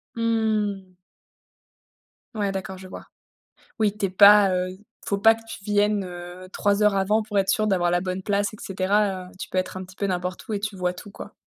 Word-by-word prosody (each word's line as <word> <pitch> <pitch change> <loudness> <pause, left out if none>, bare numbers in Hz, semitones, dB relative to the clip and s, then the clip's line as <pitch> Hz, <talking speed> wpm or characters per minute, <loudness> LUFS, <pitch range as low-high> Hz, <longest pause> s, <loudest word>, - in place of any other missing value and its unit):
Mmh. 215 -4 -1 1.4
Ouais, 200 -2 -1
d'accord, 190 -1 -5
je 190 - -10
vois. - - -10 0.7
Oui, 210 -1 +1
tu 200 - 0
es - - -6
pas, 200 +1 +7
heu, 185 0 -1
il 190 +3 -13 0.2
faut 200 - 0
pas 225 +2 +6
que 225 - -13
tu 200 - -9
viennes, 205 0 +2
heu, 180 0 -9
3 205 +2 +1
heures 210 -1 +4
avant 200 +3 +2
pour 210 -2 -2
être 195 0 +2
sûr 215 +2 +1
d'avoir 180 -4 +2
la 175 - +2
bonne 185 +1 -4
place, 205 +1 0
et - - -10
cetera. 190 0 0
Heu, - - -17
tu - - -7
peux 185 - -1
être 185 - -2
un 185 - -5
petit 185 +1 -16
peu 200 - -1
n'importe 180 +1 -4
où 215 - -2
et 200 - -2
tu 210 -1 -3
vois 180 -1 -1
tout, 200 +3 -11
quoi. - - -10
195 Hz, 225 wpm, -24 LUFS, 185-210 Hz, 1.4 s, pas